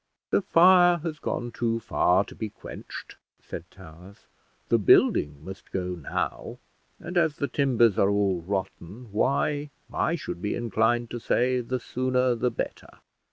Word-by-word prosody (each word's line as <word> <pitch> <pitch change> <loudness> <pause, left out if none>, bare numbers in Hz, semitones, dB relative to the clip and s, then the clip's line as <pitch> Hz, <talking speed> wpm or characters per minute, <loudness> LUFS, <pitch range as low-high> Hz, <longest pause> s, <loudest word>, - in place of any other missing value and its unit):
"The - - +3
fire 175 0 +6
has 160 -3 -4
gone 120 0 -3
too 115 -1 -1
far 95 -3 +2
to - - -12
be 110 - -5
quenched," - - -10 0.2
said - - -9
Towers; 90 +6 -15 0.4
"the 115 - +3
building 75 -6 +3
must 95 +1 -10
go 90 -1 -2
now; 85 -5 -4 0.4
and 175 +1 -1
as 160 -3 +1
the 140 - -2
timbers 120 -8 +2
are 100 - +4
all 100 -3 +1
rotten, 95 +4 -5
why, 145 +6 0 0.2
I 170 - +1
should 90 - -6
be 105 - -1
inclined 120 +1 0
to 120 - -4
say, 125 +2 +1
the 125 +2 -3
sooner 125 +1 0
the 120 +1 0
better. - - -5
115 Hz, 155 wpm, -26 LUFS, 95-130 Hz, 0.4 s, fire